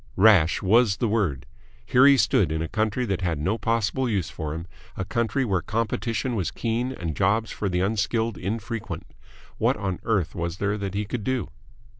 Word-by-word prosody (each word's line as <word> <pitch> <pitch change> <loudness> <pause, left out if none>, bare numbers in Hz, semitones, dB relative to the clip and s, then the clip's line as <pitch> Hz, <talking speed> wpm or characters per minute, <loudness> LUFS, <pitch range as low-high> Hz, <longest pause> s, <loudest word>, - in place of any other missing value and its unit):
Rash 95 -6 +5
was 105 +1 +4
the 115 - 0
word. 100 - 0 0.4
Here 130 +2 +5
he 140 -1 +7
stood, 80 - +3
in 80 +1 -1
a - - -3
country 110 +6 0
that 95 -4 -2
had 85 -4 0
no 95 +10 -1
possible 115 +3 0
use 95 -6 -1
for 75 -1 -5
him, 85 +1 -6 0.3
a 95 - -2
country 115 +5 0
where 95 -6 0
competition 115 - -2
was 100 -7 -1
keen 120 +2 -2
and 85 - -4
jobs 105 +4 +1
for 100 - -2
the 90 0 0
unskilled 110 +2 0
infrequent. 110 +4 -4 0.5
What - - +2
on 95 -2 -3
earth 100 -7 0
was 85 0 -3
there 105 +1 0
that 100 -1 -4
he 105 +1 -1
could 110 +1 -4
do? 130 - -1
105 Hz, 190 wpm, -25 LUFS, 90-115 Hz, 0.5 s, he